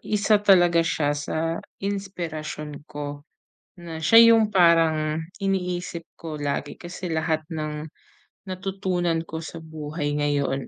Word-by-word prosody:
isa 210 0 +2
talaga 175 -4 +5
siya 150 -3 +1
sa 145 +2 -3 0.5
inspirasyon 165 -7 -4
ko, 145 +1 -7 0.5
na 170 -2 -7
siya 230 +8 +8
'yong 225 -2 +4
parang 165 -4 +3 0.2
iniisip 180 -3 -2
ko 155 -2 -7
lagi. 145 0 -3
Kasi 175 0 -6
lahat 160 0 0
nang 155 0 -4 0.5
natutunan 185 -3 -1
ko 160 -1 -6
sa 165 0 -8
buhay 150 -1 -3
ngayon 140 -2 0
165 Hz, 120 wpm, -24 LUFS, 150-185 Hz, 0.5 s, siya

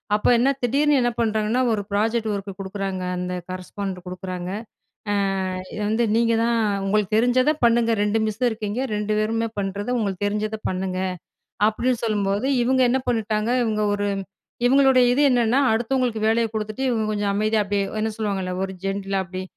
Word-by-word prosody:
அப்ப 210 - 0
என்ன 250 +4 +3
திடீர்னு 280 +4 +3
என்ன 240 0 +1
பண்ணுறாங்கன்னா, 220 +1 +1
ஒரு 210 - -1
ப்ராஜெக்ட் 220 +2 0
ஒர்க் 200 0 -4
குடுக்குறாங்க. 195 -1 -4
அந்த 180 0 -3 0.2
கரஸ்பாண்டன்ட் 185 0 -6
குடுக்குறாங்க. 180 -1 -5 0.6
அ, - - +1 0.6
"இத - - -5
வந்து 220 +2 +1
நீங்க 230 0 +3
தான் 235 0 +2 0.3
உங்களுக்கு 210 +1 +1
தெரிஞ்சத 245 +4 +3
பண்ணுங்க. 235 -1 +4
2 210 +2 +1
மிஸ்சும் 220 +4 0
இருக்கீங்க, 220 +1 -3
2 210 0 -1
பேருமே 225 +1 0
பண்றத, 200 +2 -3
உங்களுக்கு 200 -3 -2
தெரிஞ்சத 210 +1 -2
பண்ணுங்க" 185 0 -3 0.7
அப்பிடின்னு 240 +2 -1
சொல்லும்போது 205 +1 0 0.2
இவுங்க 260 +1 +3
என்ன 265 +2 +2
பண்ணிட்டாங்க, 220 -1 0
இவுங்க 215 -2 0
ஒரு 205 0 -1 0.6
இவுங்களுடைய 265 -1 +5
இது 260 - +1
என்னன்னா, 245 0 +3
அடுத்தவங்களுக்கு 240 0 0
வேலைய 225 +1 +3
குடுத்துட்டு 215 +3 -4
இவுங்க 225 -3 0
கொஞ்சம் 205 -1 0
அமைதியா 215 +1 +1
அப்பிடியே 200 0 -1 0.2
என்ன 220 +1 0
சொல்லுவாங்கல்ல, 195 -4 -2
ஒரு 190 - -5
ஜென்டிலா 195 0 -1
அப்பிடி 185 0 -6
215 Hz, 155 wpm, -23 LUFS, 200-235 Hz, 0.7 s, இவுங்களுடைய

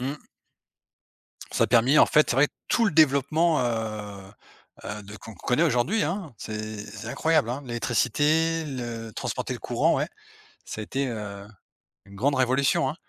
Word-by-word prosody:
Mmh. 140 +4 -5 1.2
Ça - - +1
a - - +2
permis, 125 +5 +4
en - - +8
fait, 150 - +3
c'est 120 - +1
vrai, 140 +2 +5 0.2
tout 230 - +2
le 200 - +2
développement, 155 +2 +3
heu, 110 -3 -4 0.6
heu, 105 0 -6
de 105 +1 -10
qu'on 110 +2 -11
connaît 125 - 0
aujourd'hui, 160 - +2
hein. 175 - -3
C'est 110 0 -6
c'est 110 - -9
incroyable, 155 -5 +1
hein, 130 +4 -3
l'électricité, 150 +7 +1
le 120 -5 -5
transporter - - -3
le - - -7
courant, - - +1
ouais. - - 0 0.6
Ça 110 - -6
a - - -4
été, 135 +4 -2
heu, 100 -3 -6 0.6
une 100 0 -14
grande 140 +7 +1
révolution, 130 +1 +2
hein. 150 - -5
130 Hz, 165 wpm, -26 LUFS, 110-150 Hz, 1.2 s, en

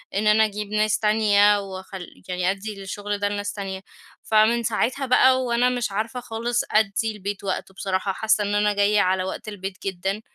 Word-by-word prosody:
إن 210 +2 +1
أنا 220 +1 +5
أجيب 210 0 -4
ناس 215 0 +1
تانية، 210 -1 +4
واخل 190 -1 -8 0.2
يعني 180 +1 0
أدّي 205 +2 -6
للشغل 205 +1 -4
ده 205 0 0
لناس 205 0 -3
تانية. 195 -2 -5 0.4
فمن 220 +2 +3
ساعتها 240 +5 0
بقى، 260 0 +4
وأنا 245 0 +2
مش 245 -4 -2
عارفة 225 +5 -3
خالص 240 0 -2
أدّي 215 +1 +2
البيت 205 -1 -6
وقته، 190 0 -3
بصراحة 190 +1 -2
حاسّة 215 +1 +1
إن 205 0 -1
أنا 210 0 +2
جايّة 205 +1 +3
على 185 0 +1
وقت 190 - -6
البيت 195 -2 -6
جدًا. 195 +3 -2
205 Hz, 180 wpm, -23 LUFS, 195-220 Hz, 0.4 s, أنا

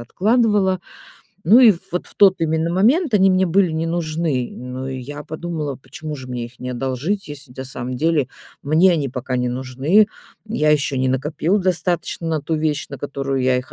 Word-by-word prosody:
откладывала. 205 - +2 0.7
Ну, 220 +7 +8
и 225 -6 +8 0.2
вот 180 - -2
в - - -17
тот 195 -2 +6
именно 160 0 0
момент 250 - +3
они 195 -2 +5
мне 185 0 +3
были 180 +1 +3
не 160 +1 -2
нужны. 160 -6 -1
Ну, 125 +1 -7
и 130 -1 -4
я 145 +4 -7
подумала, 155 -3 -4
почему 145 +4 -8
же 130 - -9
мне 125 -2 -4
их 120 +1 -18
не 125 - -5
одолжить? 135 +11 -2
Если 145 -3 -9
на 130 - -6
самом 130 -1 -5
деле 155 -1 +1 0.3
мне 165 +6 +4
они 145 -6 -1
пока 125 0 -3
не 125 0 0
нужны. 130 - +2 0.4
Я 215 -9 +1
ещё 140 -2 +1
не 130 0 +1
накопила 150 +8 0
достаточно 175 -2 -1
на 160 -2 0
ту 160 +3 -2
вещь, 155 -1 -1
на 140 - -7
которую 135 -1 -3
я 130 0 +3
их 125 - -8
155 Hz, 190 wpm, -20 LUFS, 130-180 Hz, 0.7 s, Ну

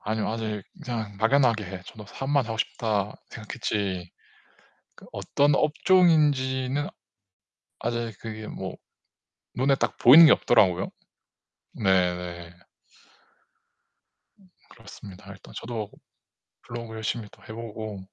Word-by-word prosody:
아니요. 110 0 -2
아직 110 -2 -3 0.2
그냥 110 -4 -4
막연하게 115 -1 +3
예 90 -1 -7
저도 105 -2 -11
'사업만 135 +3 -1
하고 110 -1 -4
싶다.' 105 -3 -1 0.2
생각했지 100 -5 -3 0.8
그 - - -16
어떤 145 +1 +1
업종인지는 145 -5 +2 0.9
아직 120 -1 -3
그게 110 -1 -7
뭐 - - -6 0.8
눈에 135 +2 +3
딱 - - -2
보이는 150 +8 +9
게 155 - +7
없더라고요. 95 -5 +3 0.9
네 90 -2 +3
네. 85 -1 -8 2.1
그렇습니다. 100 -4 -13
일단 - - -14
저도 115 -3 -5 0.7
블로그 115 -1 -7
열심히 110 0 -3
또 - - -20
해 110 - -9
보고 110 -2 -7
110 Hz, 235 characters per minute, -26 LUFS, 105-130 Hz, 2.1 s, 보이는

